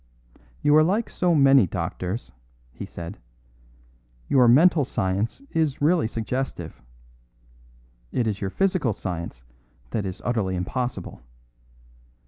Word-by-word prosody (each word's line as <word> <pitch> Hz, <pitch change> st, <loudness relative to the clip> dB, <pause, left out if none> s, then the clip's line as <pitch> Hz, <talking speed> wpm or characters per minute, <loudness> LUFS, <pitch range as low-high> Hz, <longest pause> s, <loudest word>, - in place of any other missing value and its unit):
"You 145 Hz, -, +5 dB
are 155 Hz, -, +7 dB
like 205 Hz, +8 st, 0 dB
so 175 Hz, -2 st, +1 dB
many 135 Hz, -7 st, +6 dB
doctors," 90 Hz, +5 st, -4 dB, 0.4 s
he -, -, -8 dB
said; 85 Hz, +5 st, -8 dB, 1.1 s
"your 130 Hz, -3 st, +5 dB
mental 155 Hz, +6 st, +6 dB
science 100 Hz, -, -2 dB
is 155 Hz, -4 st, 0 dB
really 160 Hz, -2 st, +3 dB
suggestive. 120 Hz, +4 st, -4 dB, 1.3 s
It 120 Hz, -, 0 dB
is 105 Hz, -2 st, -2 dB
your 95 Hz, -, -1 dB
physical 180 Hz, -, +1 dB
science 85 Hz, -10 st, -6 dB, 0.5 s
that 100 Hz, -3 st, -2 dB
is 95 Hz, -, -6 dB
utterly 110 Hz, -7 st, 0 dB
impossible. 95 Hz, -, -4 dB
120 Hz, 110 wpm, -24 LUFS, 95-150 Hz, 1.3 s, are